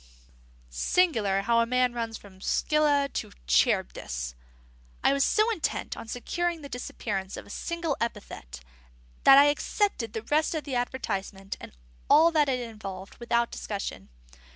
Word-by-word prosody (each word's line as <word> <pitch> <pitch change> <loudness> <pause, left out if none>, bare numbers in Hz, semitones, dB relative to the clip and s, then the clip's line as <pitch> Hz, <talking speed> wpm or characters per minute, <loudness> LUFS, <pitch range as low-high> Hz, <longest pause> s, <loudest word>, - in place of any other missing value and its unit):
Singular 205 - +2
how 230 +2 +3
a 230 - +2
man 250 0 +2
runs 230 -1 -3
from 190 -2 -16
Scylla 290 +3 +2
to - - -4
Charybdis! - - +1 0.7
I - - +5
was 280 0 +2
so 430 +8 +3
intent 340 -8 -2
on - - -9
securing 335 +7 -2
the 280 - -8
disappearance 200 -6 -4
of - - -8
a - - -12
single 335 -4 -2
epithet 70 - -5 0.6
that 270 - +10
I 285 - +9
accepted 290 - -1
the 220 - -4
rest 305 +6 +1
of 310 - -2
the 280 -1 -6
advertisement 200 -6 -3
and - - -9 0.4
all 325 +3 +7
that 300 -3 +3
it 250 -2 -1
involved 195 -4 -8
without 235 0 0
discussion. 200 - -5
235 Hz, 150 wpm, -28 LUFS, 200-295 Hz, 0.7 s, that